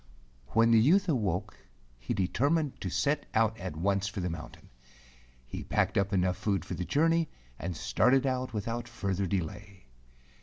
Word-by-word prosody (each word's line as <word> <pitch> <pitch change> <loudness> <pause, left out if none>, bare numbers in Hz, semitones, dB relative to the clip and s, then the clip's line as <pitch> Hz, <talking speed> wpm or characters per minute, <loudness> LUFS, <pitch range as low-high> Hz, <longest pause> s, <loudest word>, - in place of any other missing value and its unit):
Wheri 115 +1 +5
the 115 - +7
youth 180 - +4
awoke 105 - -1 0.4
he - - -3
determined 140 - 0
to 95 - -2
set 145 - 0
out 110 0 +3
at 90 -4 -5
once 100 +4 0
for 100 0 -5
the 90 -1 -2
mountain. 80 -1 -9 0.8
He - - -6
packed - - 0
up 100 0 +1
enough 90 -2 +1
food 100 -5 -1
for - - -5
the 90 - -3
journey 165 - +2 0.3
and 85 -2 -4
started 130 - +3
out 130 -1 -1
without 115 +2 -3
further 100 -5 -2
delay. 95 +2 -4
105 Hz, 160 wpm, -30 LUFS, 95-130 Hz, 0.8 s, the